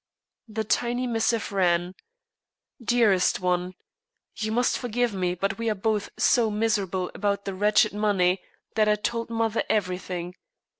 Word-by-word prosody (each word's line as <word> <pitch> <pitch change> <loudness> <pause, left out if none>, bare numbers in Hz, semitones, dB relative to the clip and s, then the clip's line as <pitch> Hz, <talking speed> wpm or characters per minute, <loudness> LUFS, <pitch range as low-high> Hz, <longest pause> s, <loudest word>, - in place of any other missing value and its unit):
The 220 0 -3
tiny 245 +3 0
missive 230 -2 0
ran: 180 -2 +1 0.9
"Dearest 215 -5 +3
One, 180 0 -1 0.6
You 215 0 -3
must 245 +2 +1
forgive 245 -1 -1
me, 180 -2 -1
but 195 +5 -2
we 230 -1 0
are 215 - 0
both 210 +1 -1
so 235 -4 +3
miserable 205 -4 -1
about 200 0 -1
that 195 - -3
wretched 205 +2 +3
money 195 -3 +2 0.3
that 215 -1 +3
I 210 - +4
told 230 +2 -3
mother 225 -1 0
everything. 180 -3 -2
210 Hz, 140 wpm, -26 LUFS, 185-225 Hz, 0.9 s, I